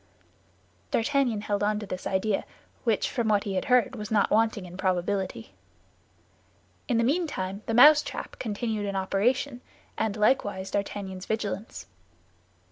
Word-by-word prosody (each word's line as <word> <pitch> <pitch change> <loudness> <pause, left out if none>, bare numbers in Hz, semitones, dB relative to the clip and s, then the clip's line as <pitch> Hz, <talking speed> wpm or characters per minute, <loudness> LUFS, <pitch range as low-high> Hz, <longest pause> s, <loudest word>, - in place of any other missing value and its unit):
D'Artagnan 245 -3 +1
held 205 -1 -1
onto 210 0 0
this 185 -1 -5
idea, 195 +2 0 0.4
which, 225 -3 +2
from 235 -3 -1
what 210 -2 +3
he 200 -3 -3
had 185 - -1
heard, 250 0 +3
was 210 -2 -6
not 215 -3 +2
wanting 220 -3 +2
in 180 0 -10
probability. 190 +3 -2 1.3
In 240 - +1
the 230 - +3
meantime, 235 - -1
the 225 - 0
mousetrap 295 +5 +5
continued 215 -1 -2
in 200 - -3
operation, 240 +7 0 0.4
and 220 -1 -1
likewise 205 -4 +1
D'Artagnan's 195 -2 -4
vigilance. 215 -1 -3
210 Hz, 130 wpm, -27 LUFS, 195-235 Hz, 1.3 s, mousetrap